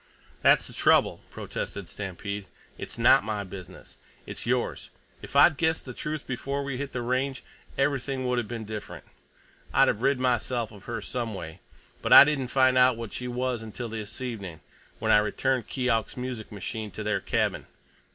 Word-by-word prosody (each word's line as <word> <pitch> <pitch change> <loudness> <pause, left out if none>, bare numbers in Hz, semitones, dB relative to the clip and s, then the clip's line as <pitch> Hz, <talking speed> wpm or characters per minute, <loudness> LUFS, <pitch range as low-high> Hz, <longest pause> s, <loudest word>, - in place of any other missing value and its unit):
"That's - - +5
the - - -7
trouble," - - +3
protested 100 -3 -5
Stampede. 100 +1 -5 0.3
"It's - - -7
not - - +6
my 105 -1 -2
business. 95 -2 -11 0.3
It's - - -7
yours. - - -1 0.3
If - - -10
I'd 145 +1 +7
guessed 160 0 +1
the 125 - -7
truth 150 +2 -4
before 140 +2 -3
we 140 -2 -3
hit 140 -1 -4
the 125 - -3
Range, 130 +2 -1 0.3
everything 135 -1 0
would 125 -1 +1
have 115 - -3
been 115 -1 -5
different. 105 0 -7 0.7
I'd - - +5
have 105 - -1
rid 135 0 +2
myself 120 -2 0
of 100 -3 -14
her 115 -3 -4
some 115 -3 -3
way. 85 -1 -7 0.4
But - - +3
I - - +13
didn't 140 -3 0
find 130 0 +4
out 125 -2 +5
what 115 -4 -6
she 125 - -4
was 125 -1 -2
until 115 +2 -6
this 110 -2 -6
evening, 100 -10 -5 0.4
when - - 0
I 105 - +7
returned 125 +3 0
Keok's 125 -4 -1
music 125 -3 -5
machine 105 +1 -5
to 110 +2 -7
their 105 0 0
cabin. - - -1
120 Hz, 180 wpm, -27 LUFS, 105-130 Hz, 0.7 s, I